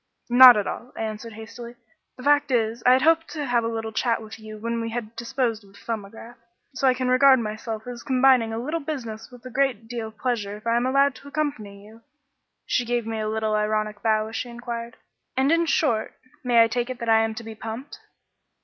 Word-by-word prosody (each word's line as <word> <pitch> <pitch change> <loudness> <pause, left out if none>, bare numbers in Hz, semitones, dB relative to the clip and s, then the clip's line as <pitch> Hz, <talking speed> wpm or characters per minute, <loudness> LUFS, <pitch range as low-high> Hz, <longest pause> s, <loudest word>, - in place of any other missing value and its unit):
"Not 250 -1 +10
at 205 - 0
all," 240 +5 -6
I - - -2
answered 220 +1 -6
hastily. 230 +2 -10 0.4
"The 255 - -10
fact 290 0 +3
is, 230 -2 0
I 250 - +8
had 260 - +3
hoped 325 +1 +3
to 300 -3 -3
have 240 -2 +1
a - - -1
little 225 -1 -4
chat 230 +1 0
with 220 0 -10
you 215 0 -9
when 230 +2 -3
we 230 - -3
had 230 -1 -5
disposed 235 -2 -2
of 195 -1 -20
the - - -17
'Thumbograph,' 225 +2 -7 0.3
so 265 +1 +1
I 255 - +4
can 255 0 -2
regard 260 +1 +6
myself 220 -1 -5
as 245 -1 -7
combining 260 -4 +3
a 225 - -3
little 300 +8 -2
business 235 -8 -6
with 245 0 -15
a 255 - -8
great 255 -4 0
deal 230 -2 -4
of 220 - -14
pleasure 210 -5 -2
if 215 - -17
I 230 0 +2
am 240 +2 +1
allowed 275 +1 +3
to 280 - -14
accompany 260 -10 -4
you." 220 +2 -16 0.6
She 245 - +1
gave 240 -1 -1
me 225 -1 -3
a 215 0 -2
little 220 0 -1
ironical 215 0 -1
bow 215 -1 +2
as 225 - -8
she 245 - -3
inquired 235 -1 -6 0.4
"And, 265 +3 +3
in 335 0 +3
short, 235 -10 0
I 255 - -31 0.2
may 235 -2 +5
take 240 +2 -2
it 255 - -5
that 235 -1 -6
I 225 0 +5
am 225 0 0
to 235 - -7
be 225 0 -8
pumped?" 225 +5 -8
235 Hz, 230 wpm, -24 LUFS, 220-255 Hz, 0.6 s, Not